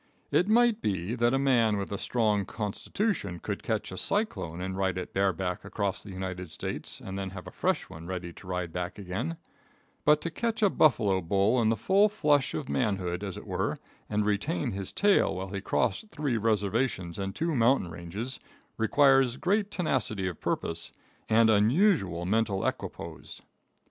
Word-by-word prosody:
It 180 - +3
might 230 0 +4
be, 95 +1 -1
that 120 -1 +2
a 135 - +2
man 120 -6 +3
with 100 0 -4
a 100 - -2
strong 105 -4 +1
constitution 105 - -2
could - - -4
catch - - -2
a - - -6
cyclone 200 - -2
and 95 +1 -3
ride 95 -1 0
it 90 - -5
bareback 95 -2 0
across 100 -3 -2
the 105 - -12
United 95 -2 -5
States 80 - -5
and 95 0 -6
then 95 -1 -3
have 95 -1 -9
a - - -8
fresh - - 0
one 80 +1 -10
ready 90 -2 -5
to 90 - -14
ride 90 -2 -3
back 90 +1 -4
again, 90 -4 -3 0.7
but 150 0 +5
to 170 - -3
catch 225 +4 -1
a 200 - +5
buffalo 105 -10 +3
bull 100 +7 +2
in 110 - +3
the 115 - +3
full 200 - +4
flush 150 -9 +2
of 145 - -3
manhood, 95 -7 -1
as 95 -3 -4
it - - -9
were, - - -1 0.3
and 105 0 +1
retain 100 -4 0
his 95 -1 -4
tail 205 - +3
while 95 +1 -4
he 100 +1 -4
crossed 215 - 0
three 145 - -1
reservations 105 -3 0
and 95 0 -3
two 165 +1 0
mountain 120 - +3
ranges, 95 +10 -6 0.4
requires 135 +1 +4
great 200 +5 +1
tenacity 120 - -1
of 90 -4 -6
purpose 85 0 0 0.4
and 115 +1 +5
unusual 110 - +3
mental 105 0 +1
equipoise. - - -5
105 Hz, 175 wpm, -29 LUFS, 95-135 Hz, 0.7 s, but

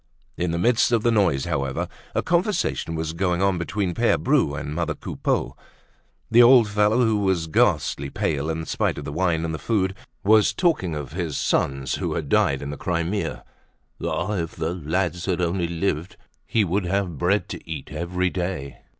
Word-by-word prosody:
In 90 - -1
the 85 - -1
midst 120 +6 +3
of 115 -2 +2
the 120 - +3
noise, 90 -12 +2
however, 70 -5 -2 0.3
a - - +1
conversation 175 - 0
was 80 0 -3
going 90 0 0
on 95 -3 +2
between 90 +1 -2
Pere 115 +6 +2
Bru 130 - +2
and 75 0 -5
mother 80 -1 -1
Coupeau. - - -2 0.8
The 120 +2 +7
old 120 -2 +7
fellow, 105 +4 +3
who 110 -2 +2
was 95 -4 +1
ghastly 70 -3 +1
pale 75 +1 -1
in 80 0 -3
spite - - -1
of - - -6
the - - -4
wine 85 -1 +1
and 80 - -3
the 75 - -4
food, 95 -4 0 0.3
was 105 +1 +5
talking 155 - +1
of 75 -3 -5
his 85 -5 -3
sons 70 -1 0
who - - -2
had 75 -4 -3
died 70 0 +2
in 70 - -4
the 75 - -6
Crimea. 85 +5 -2 0.6
Ah! 95 +4 -1
if 85 -2 -4
the 80 +1 -2
lads 90 +1 -2
had 90 -2 0
only 85 0 0
lived, 85 0 -2 0.3
he 110 - +2
would 95 +1 0
have 100 +3 +1
had 80 - -8
bread 95 +3 +1
to - - -8
eat 75 -4 -5
every 90 +3 -1
day. 90 -7 -4
90 Hz, 190 wpm, -24 LUFS, 80-100 Hz, 0.8 s, The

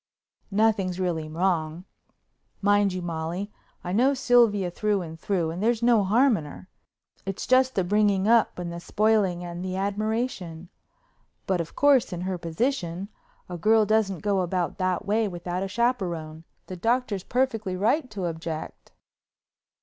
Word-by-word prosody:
"Nothing's 200 -3 +1
really 165 -4 -2
wrong. 165 0 -1 0.7
Mind 205 0 +3
you, 185 -1 -4
Molly, 170 +4 -4 0.3
I 180 - -4
know 255 +8 +3
Sylvia 230 -8 +3
through 205 0 0
and 160 -1 -9
through 170 -3 -1
and 175 +3 -5
there's 230 +1 +1
no 235 -3 +4
harm 230 +5 +4
in 155 - -6
her—it's 190 +4 -10
just 260 0 +3
the 190 - +2
bringing 200 +1 +2
up 230 -1 +3
and 175 -1 -5
the 170 - -6
spoiling 200 -2 +1
and 175 0 -6
the 185 0 -3
admiration. 200 -4 -3 0.8
But, 185 -3 0
of 165 - -8
course, 280 -6 +4
in 175 -1 -4
her 185 -1 -3
position, 180 0 -2 0.4
a 175 -1 -6
girl 220 +4 +4
doesn't 205 -4 +1
go 200 -2 +1
about 180 +1 -2
that 185 -1 0
way 215 +2 +1
without 175 0 -4
a 195 - -2
chaperone. 175 -9 -2 0.2
The 185 - -7
Doctor's 225 -1 0
perfectly 225 -7 -1
right 250 - +1
to 200 -4 -4
object." 160 -1 -6
195 Hz, 150 wpm, -26 LUFS, 175-220 Hz, 0.8 s, no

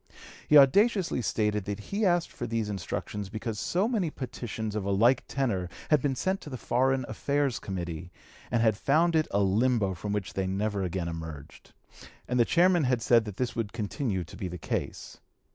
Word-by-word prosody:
He 150 - +7
audaciously 185 - +4
stated 105 -3 0
that 100 -1 -3
he 200 - -1
asked 175 -1 +1
for 120 - -5
these 115 -2 -1
instructions 100 +2 -4
because 110 0 -4
so 185 +5 +1
many 215 -9 0
petitions 115 -6 -5
of 105 -2 -2
a 100 - -2
like 115 +6 +4
tenor 105 -10 -1 0.2
had 150 -3 +5
been 135 -1 0
sent 190 +8 -1
to - - -9
the 130 - -5
Foreign 130 +3 +1
Affairs 140 -3 0
Committee, 85 -3 -5 0.4
and 115 -1 +1
had 110 -2 +4
found 160 +9 +2
it 155 -1 +3
a 100 - +1
limbo 105 0 +2
from 100 +3 -5
which 105 -2 -3
they 95 -1 -1
never 100 +1 -1
again 90 -1 -2
emerged, 80 -3 -8 0.5
and 125 0 0
the 120 - +5
chairman 175 0 +4
had 125 -3 +1
said 115 -2 +4
that 105 -3 -7
this 125 -1 -2
would 115 -3 -3
continue 110 - -2
to 85 - -12
be 95 - -4
the 90 0 -6
case. - - -4
115 Hz, 195 wpm, -28 LUFS, 100-140 Hz, 0.5 s, He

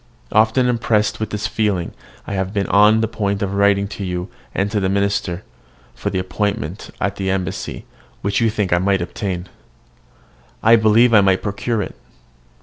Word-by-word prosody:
Often 110 +4 +3
impressed 115 -3 +1
with 110 -1 -2
this 105 0 -3
feeling 95 -4 -1 0.3
I - - -5
have 95 -1 -1
been 100 -1 +1
on 105 +2 +5
the 110 - +1
point 100 -2 -2
of 100 -1 -2
writing 100 0 +3
to 105 - -6
you 90 +1 -3 0.2
and 100 +1 -1
to 105 - +1
the 95 -1 0
minister, 100 -2 -1 0.5
for - - -3
the - - -2
appointment 95 -1 -3
at 100 +1 -1
the 95 -1 -2
embassy, 95 -2 -3 0.4
which 100 +3 0
you 115 - +3
think 105 -4 -1
I 85 - +3
might 95 -1 +1
obtain. 90 0 -4 1.2
I 115 +1 +7
believe 115 +2 +4
I 105 - +8
might 95 -1 +2
procure 105 +2 -1
it. - - -8
100 Hz, 175 wpm, -20 LUFS, 95-110 Hz, 1.2 s, I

